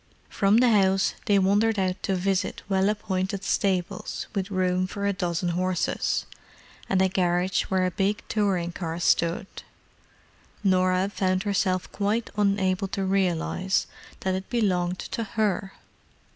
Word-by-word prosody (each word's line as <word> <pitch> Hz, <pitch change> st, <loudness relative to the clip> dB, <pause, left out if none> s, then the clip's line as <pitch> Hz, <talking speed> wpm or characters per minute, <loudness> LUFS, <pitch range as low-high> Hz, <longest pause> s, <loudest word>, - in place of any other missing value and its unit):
From 200 Hz, +2 st, +3 dB
the 245 Hz, 0 st, +5 dB
house 195 Hz, -2 st, +3 dB
they 205 Hz, -, +4 dB
wandered 205 Hz, +3 st, +3 dB
out 185 Hz, -1 st, -1 dB
to 195 Hz, -, 0 dB
visit 190 Hz, +1 st, -1 dB
well 195 Hz, 0 st, +2 dB
appointed 195 Hz, -2 st, -2 dB
stables 190 Hz, -2 st, -1 dB
with 195 Hz, -1 st, -2 dB
room 185 Hz, -1 st, +1 dB
for 200 Hz, +1 st, -4 dB
a 200 Hz, -, +2 dB
dozen 175 Hz, -1 st, -1 dB
horses, 180 Hz, +1 st, 0 dB, 0.6 s
and 190 Hz, -1 st, +3 dB
a -, -, +4 dB
garage 180 Hz, 0 st, +1 dB
where 185 Hz, -1 st, +1 dB
a 185 Hz, -, 0 dB
big 200 Hz, +4 st, -1 dB
touring 190 Hz, -5 st, 0 dB
car 170 Hz, -1 st, -4 dB
stood—Norah 185 Hz, +2 st, -2 dB
found 185 Hz, -1 st, 0 dB
herself 185 Hz, -3 st, 0 dB
quite 210 Hz, +3 st, -1 dB
unable 195 Hz, -2 st, +1 dB
to 195 Hz, 0 st, -3 dB
realize 190 Hz, 0 st, 0 dB, 0.4 s
that 190 Hz, -, 0 dB
it 190 Hz, +1 st, -4 dB
belonged 185 Hz, -6 st, 0 dB
to 230 Hz, -, -4 dB
her! 205 Hz, -2 st, -1 dB
190 Hz, 135 wpm, -26 LUFS, 185-200 Hz, 0.6 s, the